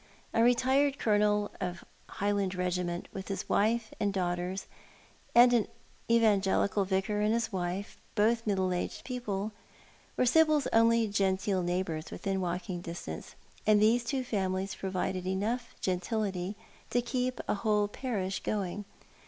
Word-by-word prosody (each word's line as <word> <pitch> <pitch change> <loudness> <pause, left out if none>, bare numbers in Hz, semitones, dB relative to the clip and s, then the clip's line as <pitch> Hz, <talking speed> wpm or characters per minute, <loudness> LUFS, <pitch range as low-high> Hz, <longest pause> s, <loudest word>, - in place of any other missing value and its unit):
A 225 - +3
retired 265 +4 +3
colonel 210 -2 +2
of 180 0 -3 0.3
a - - -11
Highland 200 -2 0
regiment, 180 -1 -2
with 190 0 -6
his 195 - -4
wife 220 +2 +1
and 205 -1 +1
daughters, 180 0 -2 0.7
and 245 +1 +8
an 230 -4 +3 0.4
evangelical 205 -3 +3
vicar 195 +2 0
and 210 +1 +2
bis 230 0 -1
wife, 185 +1 -3 0.2
both 225 +2 +2
middle 190 -3 +1
aged 180 - -3
people, 220 -5 -3 0.7
were - - +3
Sibyl's 305 +2 +4
only 230 0 +5
genteel 195 -1 +1
neighbours 175 -3 -2
within 195 -1 -2
walking 180 0 -3
distance, 170 - -7 0.3
and 215 -1 +6
these 225 +3 +4
two 260 +2 -1
families 190 -4 -1
provided 185 -1 -2
enough 220 +6 -2
gentility 190 +1 -1 0.3
to 245 0 +1
keep 255 +1 -1
a - - +2
whole 210 0 +1
parish 205 -4 -3
going. 205 0 -2
205 Hz, 135 wpm, -30 LUFS, 185-230 Hz, 0.7 s, and